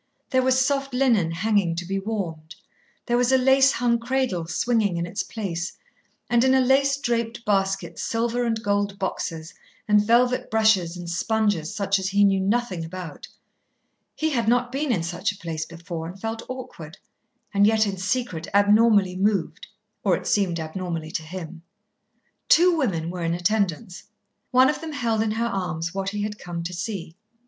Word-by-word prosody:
There 260 -1 +3
was 260 0 +3
soft 275 0 0
linen 235 -10 +3
hanging 185 0 +1
to 175 +1 -4
be 195 +2 -2
warmed, 175 -7 -5 0.5
there 240 -1 +1
was 245 +1 +2
a 265 - +6
lace 265 +1 +5
hung 235 -1 +1
cradle 235 -8 -1
swinging 205 +1 +1
in 170 - -1
its 190 +4 -3
place, 175 -6 -4 0.5
and 240 0 +3
in 265 0 +4
a - - +5
lace 275 +2 +3
draped 235 -3 -2
basket 195 -1 0
silver 235 +1 -1
and 225 -2 -1
gold 205 -1 0
boxes 165 -3 -4 0.3
and 210 -1 +4
velvet 245 +3 +2
brushes 210 -6 +2
and 175 -1 -7
sponges 205 0 0
such 200 -1 +1
as 190 - -2
he 200 +1 +3
knew 195 -1 +4
nothing 195 -3 0
about. 165 -2 -8 0.9
He 315 0 -1
had 235 -5 0
not 245 +1 +2
been 275 +1 -1
in 180 -8 0
such 175 +4 -2
a 200 - -12
place 160 -3 -5
before, 170 -1 -7
and 185 +3 -9
felt 225 +2 -4
awkward, 245 -11 -8 0.6
and 200 0 +5
yet 220 0 +3
in 195 -2 -3
secret 195 -3 -2
abnormally 205 -2 +4
moved, 195 -3 -1 0.4
or 190 -3 +3
it - - -10
seemed 185 -5 +1
abnormally 160 0 -4
to - - -2
him. 165 +1 -8 0.9
Two 355 +1 +6
women 175 - -1
were 180 -1 -6
in 165 0 0
attendance. 180 -2 -1 0.4
One 255 0 +5
of 300 +2 -1
them 320 -1 -6
held 230 -5 0
in 220 -1 0
her 230 +1 -1
arms 175 -6 -3
what 195 0 -2
he 205 0 -3
had 210 0 -4
come 170 -1 -5
to 175 +2 -5
see. 175 -2 -5
205 Hz, 175 wpm, -24 LUFS, 175-235 Hz, 0.9 s, a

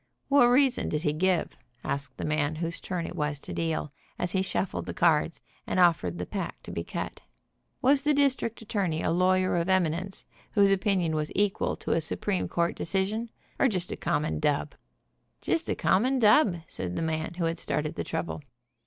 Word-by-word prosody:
"What 280 -4 +6
reason 260 +1 +3
did 150 0 -2
he 150 - +1
give?" 180 +2 0 0.2
asked 140 -2 -4
the - - -4
man 150 0 0
whose 165 +1 -3
turn 180 -3 -3
it - - -6
was 150 -3 -1
to - - -7
deal, 160 -3 -2 0.2
as 175 - -1
he 190 - +1
shuffled 190 0 -2
the - - -5
cards, 165 -1 +2 0.3
and - - 0
of 175 -3 +5
fered 85 -1 -4
the 90 - -3
pack - - -5
to - - -8
be 85 - -3
cut. - - -5 0.6
"Was 275 +2 +5
the 295 +1 +2
district 265 -5 +1
attorney 185 -7 -1
a - - +1
lawyer 185 +1 +2
of 170 +2 0
eminence, 185 +1 0 0.3
whose 200 -2 +5
opinion 190 -4 +1
was 155 -1 -1
equal 205 0 +1
to - - -5
a 165 - +2
Supreme 190 +4 -2
court 170 0 0
decision, 200 +6 -1 0.3
or - - +5
just 185 -7 -2
a - - -2
common 150 +1 -1
dub?" 150 -1 0 0.7
"Just 330 - -1
a - - +1
common 255 +8 +2
dub," 210 - +4
said 90 -1 -5
the - - -1
man 160 +1 -2
who 175 - -2
had 165 0 -1
started 150 0 -2
the - - -3
trouble. 165 -1 -4
175 Hz, 195 wpm, -28 LUFS, 155-200 Hz, 0.7 s, What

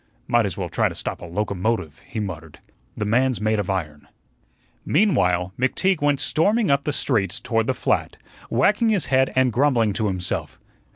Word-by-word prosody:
"Might 120 -3 +3
as 90 - -6
well 90 -3 -3
try - - +1
to - - -9
stop - - -5
a - - -7
locomotive," 100 -2 -2
he 130 -5 -5
muttered. 85 -6 -6 0.4
"The 105 - -2
man's 125 +3 +2
made 110 0 +1
of 100 - -3
iron." 75 -6 -4 0.8
Meanwhile, 95 - +2
McTeague 165 +7 +1
went 145 -1 +2
storming 205 +3 +2
up 140 0 +1
the 150 - 0
street 105 -10 -1
toward 115 -3 0
the 130 - 0
flat, - - -1 0.3
wagging 210 - +2
his 205 -6 +1
head 130 0 +3
and 130 -2 +3
grumbling 120 -4 +2
to 105 +3 -1
himself. 95 -2 -3
115 Hz, 175 wpm, -23 LUFS, 95-140 Hz, 0.8 s, Might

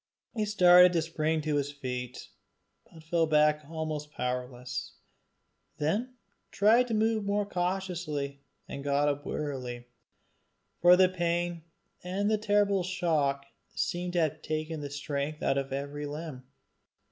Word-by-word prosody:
He 215 -3 -1
started 180 -3 +7
to 165 - +2
spring 160 -1 -1
to 150 -1 0
his 145 0 -1
feet, 125 -3 -6 0.6
but 160 -1 -14
fell 165 0 +1
back 150 0 +3
almost 155 -2 -4
powerless; 125 -1 -4 0.8
then 215 +12 -1 0.3
tried 230 +5 +4
more 215 -2 +1
cautiously 175 -7 -3 0.3
and 140 - -6
got 145 +1 +2
up 145 0 -2
wearily, 125 -5 -4 1.0
for 175 +1 +8
the 185 0 +6
pain 175 -1 -1 0.4
and 195 +4 -1
the 215 - +2
terrible 205 -2 +2
shock 155 -7 0 0.3
seemed 175 0 -2
to 175 - +2
have 155 -1 -1
taken 155 0 -3
the 145 - -5
strength 145 +1 -4
out 135 - +2
of 135 0 -5
every 145 +2 -4
limb. 145 -3 -7
155 Hz, 130 wpm, -29 LUFS, 145-180 Hz, 1.0 s, for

